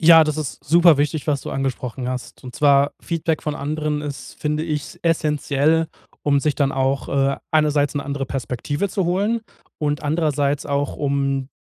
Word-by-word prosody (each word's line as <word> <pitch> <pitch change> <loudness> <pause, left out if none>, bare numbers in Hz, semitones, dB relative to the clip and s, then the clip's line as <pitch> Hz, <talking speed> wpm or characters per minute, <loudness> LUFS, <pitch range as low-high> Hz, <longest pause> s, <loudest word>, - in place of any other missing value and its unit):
Ja, 165 -1 +8
das 155 0 -1
ist 150 -4 -5
superwichtig, 155 -2 +4
was 145 -3 +1
du - - -6
angesprochen 130 -1 -3
hast. 125 0 -6
Und 125 - -8
zwar 140 -1 +4
Feedback 165 -2 -1
von 150 -1 -2
anderen 150 +1 -2
ist- 135 -4 -7
finde 150 +1 0
ich, 150 -3 -4
essenziell- 155 -1 +2 0.4
um 140 -1 +3
sich 150 0 +1
dann 140 -2 +1
auch, 135 +1 0
äh, 135 0 +1
einerseits 150 -2 +2
'ne 140 - -2
andere 140 -1 -3
Perspektive 135 - -2
zu 190 -1 -1
holen 205 +6 +1 0.4
und 150 0 -1
andererseits 145 -2 0
auch, 140 -1 -1
um 140 -2 0
145 Hz, 165 wpm, -21 LUFS, 140-155 Hz, 0.4 s, Ja